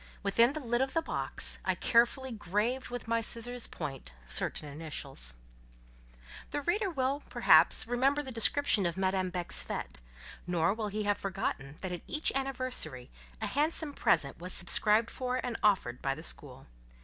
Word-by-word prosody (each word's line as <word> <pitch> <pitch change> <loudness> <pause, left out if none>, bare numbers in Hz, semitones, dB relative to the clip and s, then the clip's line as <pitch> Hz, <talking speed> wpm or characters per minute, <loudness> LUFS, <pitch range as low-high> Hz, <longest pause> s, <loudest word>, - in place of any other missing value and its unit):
Within 230 +6 +4
the 310 - -4
lid 240 -2 -1
of 265 0 -1
the 330 - +3
box, - - -3
I - - 0
carefully 245 +3 +2
graved 220 +5 -2
with 245 -2 -6
my 230 0 +1
scissors' 240 +2 -1
point 135 - -6
certain 105 - -1
initials. 140 - -3 1.1
The 290 - -3
reader 395 +6 0
will, 275 -3 -1
perhaps, - - +6
remember 270 +5 +1
the 265 - -7
description 230 -3 +3
of 170 - -4
Madame 190 -1 0
Beck's 180 -1 -3
fête; - - -5 0.5
nor 175 +2 +2
will 220 -1 -3
he 210 +1 -3
have 205 0 0
forgotten 160 -8 -3
that 185 -1 -4
at 175 - -5
each 310 0 0
anniversary, 255 - -1 0.3
a - - -2
handsome 305 +1 -1
present 140 - +1
was 180 +1 -4
subscribed 210 +6 +4
for 255 -1 -3
and 245 -2 -3
offered 185 - +1
by 135 0 -1
the 155 - -10
school. 135 -5 -7
220 Hz, 160 wpm, -31 LUFS, 175-255 Hz, 1.1 s, perhaps